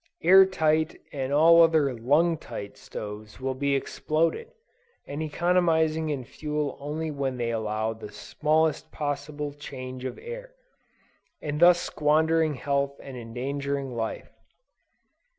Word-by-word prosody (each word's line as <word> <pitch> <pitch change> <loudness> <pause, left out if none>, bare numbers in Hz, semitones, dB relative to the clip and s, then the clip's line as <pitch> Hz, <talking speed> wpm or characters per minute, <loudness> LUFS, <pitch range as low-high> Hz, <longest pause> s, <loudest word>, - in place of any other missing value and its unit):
Air 190 +1 +8
tight 160 -3 +1
and 135 -2 -3
all 165 +3 +7
other 160 -5 +4
lung 145 +9 +2
tight 105 -8 -8
stoves 105 +1 -8
will 130 0 -2
be 140 +1 0
exploded, 165 - -1 0.6
as 145 - -5
economizing 160 -1 +1
in 140 -4 -2
fuel 150 +2 -3
only 155 +2 -3
when 135 -3 -2
they 120 -1 -1
allow 110 0 -1
the 110 -2 -10
smallest 155 +6 0
possible 145 0 -4
change 130 -3 -8
of 130 - -4
air, - - -8 0.8
and 150 0 -4
thus 175 +1 +7
squandering 160 0 +2
health 140 +1 -1
and 135 -2 -9
endangering 135 +3 -3
life. 115 -1 -4
145 Hz, 125 wpm, -26 LUFS, 130-160 Hz, 0.8 s, Air